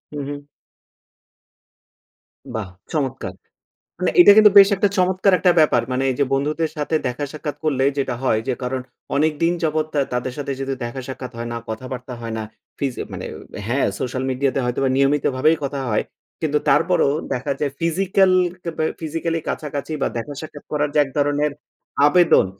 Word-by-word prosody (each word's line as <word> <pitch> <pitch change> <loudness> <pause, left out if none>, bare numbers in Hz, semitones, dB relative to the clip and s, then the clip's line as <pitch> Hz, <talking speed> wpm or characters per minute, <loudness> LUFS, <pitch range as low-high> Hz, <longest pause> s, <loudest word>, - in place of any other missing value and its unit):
উহু। 145 0 -6 2.1
বাহ! 105 -4 -3 0.3
চমৎকার! 135 -4 -2 0.7
মানে - - +1
এটা 205 - +10
কিন্তু 215 -1 +8
বেশ 195 0 +9
একটা 200 +1 +2
চমৎকার 185 +2 +3
একটা 180 -2 +4
ব্যাপার 150 -6 +4
মানে 130 +1 0
এই - - -1
যে - - +5
বন্ধুদের 150 +3 0
সাথে 150 +1 -2
দেখা 125 +4 -2
সাক্ষাৎ 150 -1 -5
করলে 135 -4 +1
যেটা 130 -2 0
হয় 110 -4 +2
যে 130 - +1
কারণ 130 +1 -2 0.4
অনেক 155 +2 +3
দিন 170 +1 +4
যাবৎ 155 -1 +1
তা 145 - +3
তাদের 125 +1 -2
সাথে 140 -1 -3 0.3
দেখা 120 +3 -5
সাক্ষাৎ 130 -1 -6
হয় 120 - -4
না, - - -3
কথাবার্তা 125 +2 -6
হয় 115 -1 -5
না। - - -3 0.4
ফিজ 135 -3 -1 0.2
মানে - - -5 0.4
হ্যাঁ, 130 +4 +1
সোশ্যাল 130 +1 -3
মিডিয়াতে 135 0 0
হয়তোবা 130 +2 0
নিয়মিত 140 +1 +2
ভাবেই 155 +5 +4
কথা 140 0 -3
হয়। 105 - +2 0.4
কিন্তু 150 -2 +1
তারপরও 165 -2 +3 0.2
দেখা 135 +3 -2
যায় 145 - 0
ফিজিক্যাল 190 +3 +2 0.3
কেবে 160 -2 -2 0.2
ফিজিক্যাল 165 +1 -2
কাছাকাছি 145 0 -4
বা - - +2
দেখা 115 +5 -4
সাক্ষাৎ 150 -2 -10
করার 150 0 +1
যে - - +3
এক 135 - -10
ধরনের 145 0 +1 0.5
আবেদন, 175 - +5
145 Hz, 165 wpm, -21 LUFS, 130-160 Hz, 2.1 s, এটা